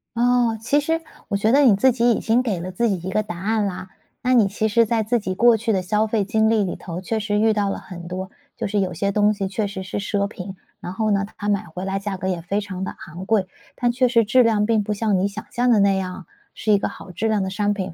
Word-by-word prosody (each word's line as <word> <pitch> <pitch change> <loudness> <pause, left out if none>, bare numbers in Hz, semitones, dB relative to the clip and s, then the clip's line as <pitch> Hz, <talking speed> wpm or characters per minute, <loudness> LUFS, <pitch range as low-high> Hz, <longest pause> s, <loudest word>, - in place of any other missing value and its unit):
哦， 240 -1 +2
其 285 +5 +2
实 325 +3 -1 0.3
我 200 - +1
觉 215 +3 +2
得 280 +3 +5
你 240 -7 +6
自 260 +6 +4
己 240 0 +2
已 - - +1
经 235 +3 +2
给 205 -8 -1
了 180 +2 -5
自 235 +6 0
己 185 -3 -2
一 - - -2
个 215 +3 0
答 200 -5 -7
案 215 +2 0
啦。 185 -1 -5 0.3
那 255 0 +2
你 220 -5 +5
其 215 +2 -1
实 230 +2 +3
在 225 +1 +1
自 230 +3 +1
己 190 -3 -3
过 235 +4 +5
去 225 0 0
的 190 - +1
消 210 +4 +1
费 215 -2 0
经 220 +2 +2
历 220 -2 +3
里 185 - -3
头 175 0 -7
确 220 +4 -2
实 210 -1 0
遇 220 +1 +4
到 205 -2 0
了 - - -4
很 175 -2 -10
多 185 +2 -5 0.3
就 - - -3
是 205 0 0
有 185 -2 -1
些 200 +5 -1
东 210 +1 +3
西 200 -2 -3
确 200 +3 -2
实 195 -1 -5
是 185 - -5
奢 200 0 -1
品， 190 -2 -8 0.2
然 180 - -6
后 220 +2 0
呢， 200 -1 +1
它 205 0 -3
买 200 -1 0
回 175 +2 -7
来 195 0 -2
价 195 0 -3
格 185 0 -4
也 180 -3 -1
非 200 +4 -1
常 190 -2 -6
地 - - -5
昂 175 +3 -8
贵， 200 -3 +1 0.3
但 240 -1 +1
确 255 +1 +2
实 230 -2 +4
质 245 +4 +4
量 215 -2 +2
并 220 -2 +2
不 210 +1 -2
像 210 -2 +1
你 190 - +1
想 210 +2 -7
象 245 +1 +2
的 220 - +5
那 200 -1 +4
样， 185 -1 -5 0.3
是 215 - -1
一 205 - +6
个 195 - -1
好 - - -11
质 200 +6 -2
量 215 -2 +1
的 190 - -2
商 205 +2 0
品， 190 -3 -4
205 Hz, 310 characters per minute, -22 LUFS, 190-225 Hz, 0.3 s, 你